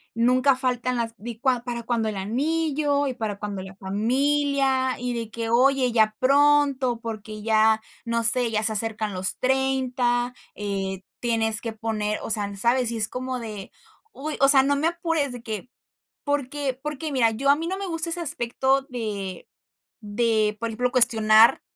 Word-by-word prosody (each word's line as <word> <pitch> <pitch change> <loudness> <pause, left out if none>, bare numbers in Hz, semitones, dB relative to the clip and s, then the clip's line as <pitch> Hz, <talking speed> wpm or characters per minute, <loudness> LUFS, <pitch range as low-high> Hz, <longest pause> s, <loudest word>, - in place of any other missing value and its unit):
nunca 255 +3 +3
faltan 255 -1 -1
las 230 -1 -2
di 225 +1 -8
cua 255 -3 +1
¿para 235 -1 -4
cuándo 230 -1 -1
el 215 - -3
anillo, 285 +6 -1
y 255 - -3
para 210 -3 -4
cuándo 205 -2 -5
la 190 0 -11
familia? 265 +6 0
Y 245 0 -3
de 230 -2 -4
que: 225 0 -5
"Oye 255 +1 +3
ya 220 -2 +2
pronto, 275 -3 +3
porque 215 -1 -7
ya, 220 0 +3 0.2
no 230 0 -1
sé, 235 +1 +7
ya 215 -1 -1
se 220 - +3
acercan 215 -1 -2
los 185 +1 -3
30". 255 -2 0 0.2
Eh, 195 -2 -4 0.2
tienes 225 -2 +1
que 230 -1 -5
poner, 215 -1 -3
o - - -5
sea, 205 -2 0
¿sabes? 235 +4 +1
Y 230 - -3
es 215 0 0
como 255 +1 -4
de, 215 -4 -8 0.4
uy, 300 +3 -5
o 275 - +5
sea, 270 -1 +7
no 285 +1 +1
me 305 +3 +1
apures 330 -5 -1
de 245 - -9
que 220 0 -6 0.6
porque 285 -2 -2
porque 300 +1 -4
mira 250 -5 +2
yo 250 +5 -2
a 280 - +6
mí 325 - -4
no 380 +2 -3
me 395 - -4
gusta 330 -1 -1
ese 345 +1 0
aspecto 265 -2 0
de 205 -6 -5 0.5
de, 215 -1 0
por 230 0 -3
ejemplo, 245 +3 -1
cuestionar 220 -2 +5
240 Hz, 175 wpm, -24 LUFS, 220-270 Hz, 0.6 s, sé